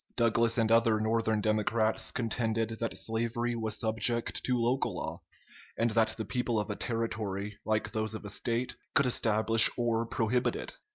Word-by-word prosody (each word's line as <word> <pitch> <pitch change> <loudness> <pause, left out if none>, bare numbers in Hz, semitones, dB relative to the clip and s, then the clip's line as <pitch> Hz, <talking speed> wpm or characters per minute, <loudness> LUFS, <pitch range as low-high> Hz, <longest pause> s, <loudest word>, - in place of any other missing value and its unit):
Douglas 115 0 +2
and 115 -1 +2
other 115 -1 +4
Northern 110 0 +1
Democrats 110 +1 +1
contended 115 -1 -1
that 115 - -3
slavery 115 +1 -1
was 110 -1 -3
subject 110 +2 0
to 125 -1 +1
local 120 +3 0
law, - - -5 0.6
and 115 0 +2
that 110 0 +2
the 110 - -3
people 120 0 -1
of 105 0 -3
a - - -3
Territory, 105 -3 -3
like 110 -1 0
those 110 0 -2
of 110 - -8
a - - -4
State, 120 +4 -2 0.2
could 140 - +5
establish 110 -2 +4
or 115 -1 0
prohibit 115 +2 0
it. - - -4
115 Hz, 165 wpm, -30 LUFS, 110-115 Hz, 0.6 s, could